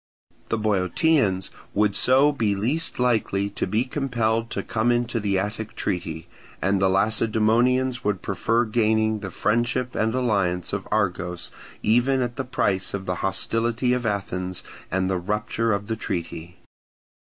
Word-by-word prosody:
The 115 - +1
Boeotians 105 - +1 0.2
would 105 0 +2
so 135 +6 +5
be 110 -8 0
least 135 +12 -1
likely 110 -5 +1
to - - -2
be 110 +5 +1
compelled 115 -4 -1
to - - -3
come 115 +2 +1
into 120 -1 0
the 100 -2 0
Attic 105 +3 -3
treaty; 85 -3 -3 0.3
and 95 +1 +1
the 95 - +4
Lacedaemonians 115 +5 +2
would 100 -3 -1
prefer 115 +4 +1
gaining 110 -1 +2
the 100 -2 -5
friendship 120 +5 0
and 110 +2 0
alliance 100 -9 0
of 100 -1 -3
Argos 90 -4 -1 0.3
even 125 +4 +3
at 120 -1 -4
the 130 - -2
price 100 -7 -1
of 95 -1 -5
the 90 -1 -2
hostility 115 +5 0
of 125 -2 -1
Athens 95 -3 -3 0.3
and 95 +1 0
the 95 -1 0
rupture 105 +4 -1
of 100 0 -1
the 110 - -2
treaty. 85 -3 -5
110 Hz, 150 wpm, -24 LUFS, 95-120 Hz, 0.3 s, so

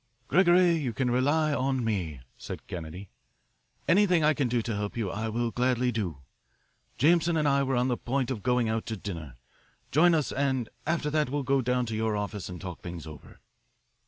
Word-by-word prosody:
"Gregory, 175 -1 +5
you 130 -7 -2
can 125 0 0
rely 145 +5 +2
on 130 -2 0
me," 85 - -2
said - - -8
Kennedy. 90 +3 -7 0.8
"Anything 180 -3 +4
I 155 +1 +5
can 140 -3 0
do 120 -1 0
to 115 -2 -2
help 105 +2 -4
you 105 -5 -1
I 110 +2 -3
will 115 +1 -1
gladly 125 0 +1
do. 90 - -4 0.7
Jameson 170 +4 +3
and 150 -1 +2
I 140 0 +3
were 135 -1 0
on 125 +1 +2
the 125 -2 0
point 135 +1 -1
of 115 -5 -3
going 125 0 +1
out 110 0 -2
to 110 - -3
dinner. 80 - -7 0.6
Join 165 +3 +5
us, 155 -3 0
and 130 -4 0 0.2
after 160 -2 0
that 150 -3 +1
we - - -7
will 145 -1 0
go 135 +1 +2
down 125 0 0
to 110 -1 -4
your 110 -1 0
office 105 -2 -4
and 90 -1 -7
talk 90 -3 -7
things 85 -3 -7
over." 75 -3 -12
125 Hz, 200 wpm, -28 LUFS, 105-145 Hz, 0.8 s, Gregory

